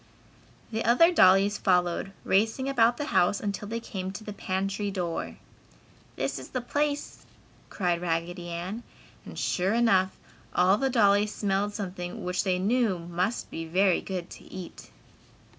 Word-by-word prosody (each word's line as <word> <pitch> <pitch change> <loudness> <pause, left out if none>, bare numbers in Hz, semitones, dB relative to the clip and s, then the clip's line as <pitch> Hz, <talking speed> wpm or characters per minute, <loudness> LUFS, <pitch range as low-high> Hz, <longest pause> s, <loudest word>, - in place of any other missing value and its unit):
The 225 0 -1
other 290 +10 +5
dollies 195 - +5
followed, 180 0 +1
racing 225 +7 +1
about 240 -3 +3
the 295 - -2
house 180 +3 +3
until 205 0 -4
they 230 +2 -3
came 190 -4 -5
to 210 - -8
the 210 - -6
pantry 195 +1 -2
door. 180 -4 -3 0.8
"This - - -2
is - - -10
the 255 - -2
place!" 290 +4 -2 0.5
cried 175 -3 -1
Raggedy 175 +1 -2
Ann, 180 +7 -4 0.4
and - - -10
sure 190 +4 0
enough, 195 -6 +3 0.4
all 185 +3 +4
the 270 0 +1
dollies 210 -3 +3
smelled 205 0 0
something 180 -4 -5
which 180 0 -1
they 185 -1 +1
knew 215 +1 +1
must 175 +6 -3
be 165 - -5
very 185 +2 +2
good 180 -3 -5
to - - -11
eat. 185 -2 -9
195 Hz, 150 wpm, -27 LUFS, 180-225 Hz, 0.8 s, other